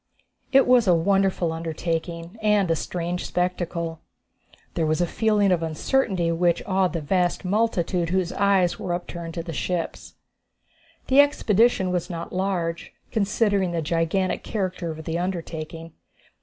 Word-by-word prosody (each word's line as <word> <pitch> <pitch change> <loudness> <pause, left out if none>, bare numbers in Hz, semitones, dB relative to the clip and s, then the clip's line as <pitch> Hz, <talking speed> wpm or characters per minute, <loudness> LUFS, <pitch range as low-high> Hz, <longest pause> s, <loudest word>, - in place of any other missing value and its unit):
It 270 0 +6
was 245 -3 +4
a 180 - +6
wonderful 190 0 +2
undertaking 165 +3 -4
and 210 -4 +3
a - - +3
strange 175 +2 -3
spectacle. 170 -2 -2 0.7
There 160 - 0
was 155 +1 +1
a 175 - +3
feeling 210 +1 +2
of 175 -2 +2
uncertainty 175 - 0
which 170 0 +1
awed 190 -2 +1
the 165 - -2
vast 180 +4 0
multitude 185 -4 0
whose 185 -1 0
eyes 195 -3 +2
were 175 -1 -2
upturned 170 -1 -7
to 170 - -3
the 165 -1 -6
ships. 175 +2 -3 0.9
The 265 +1 +4
expedition 225 -8 +2
was 180 -1 -2
not 170 -2 -6
large, 180 -3 -2 0.2
considering 200 -3 +1
the 165 -1 -1
gigantic 170 +4 0
character 185 -5 -3
of 160 0 -7
the 165 +1 -2
undertaking. 165 -2 -5
180 Hz, 140 wpm, -24 LUFS, 165-195 Hz, 0.9 s, It